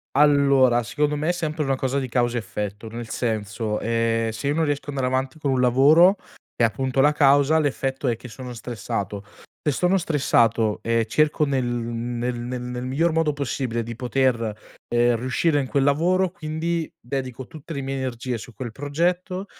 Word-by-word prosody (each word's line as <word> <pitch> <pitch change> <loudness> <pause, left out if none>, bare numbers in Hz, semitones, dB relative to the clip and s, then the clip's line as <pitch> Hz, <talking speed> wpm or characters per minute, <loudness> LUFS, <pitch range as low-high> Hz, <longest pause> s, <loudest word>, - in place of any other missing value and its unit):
Allora, 140 -4 +5
secondo 150 +5 -1
me 150 +3 -1
è - - +5
sempre 155 -3 -2
una 135 -1 +1
cosa 130 +1 -1
di 130 - -3
causa 120 0 +1
effetto, 105 +1 -5
nel 115 +1 -7
senso, 110 -2 -2
ehm, 115 0 0
se 115 +5 -5
io 145 - +1
non 165 0 +2
riesco 145 0 -2
ad 145 - -5
andare 130 -2 0
avanti 130 +2 -1
con 145 -3 -1
un 130 -1 +1
lavoro, 150 +10 +6 0.4
è - - +1
appunto 130 +4 +1
la 150 +2 +5
causa, 145 +1 +4
l'effetto 135 -2 -1
è 120 - +2
che 120 - -11
sono 125 +2 -8
stressato. 105 -4 -4 0.4
Se - - +4
sono 180 +5 +2
stressato 115 - +2
e 115 0 +1
cerco 150 +5 +2
nel 135 -3 0
nel 120 0 -3
nel 125 +1 -4
nel 125 0 -5
miglior 160 +6 +1
modo 160 -2 +1
possibile 130 -4 -2
di 115 +1 -6
poter, 120 -3 0 0.3
ehm, 120 0 +2
riuscire 140 +6 +1
in 135 - -2
quel 140 +1 +1
lavoro, 175 +6 +2
quindi 165 -1 -3
dedico 130 0 -5
tutte 160 0 -9
le 140 - -3
mie 135 0 -3
energie 125 -2 -3
su 120 - -11
quel 120 0 -6
progetto, 175 - -1
130 Hz, 185 wpm, -23 LUFS, 120-150 Hz, 0.4 s, lavoro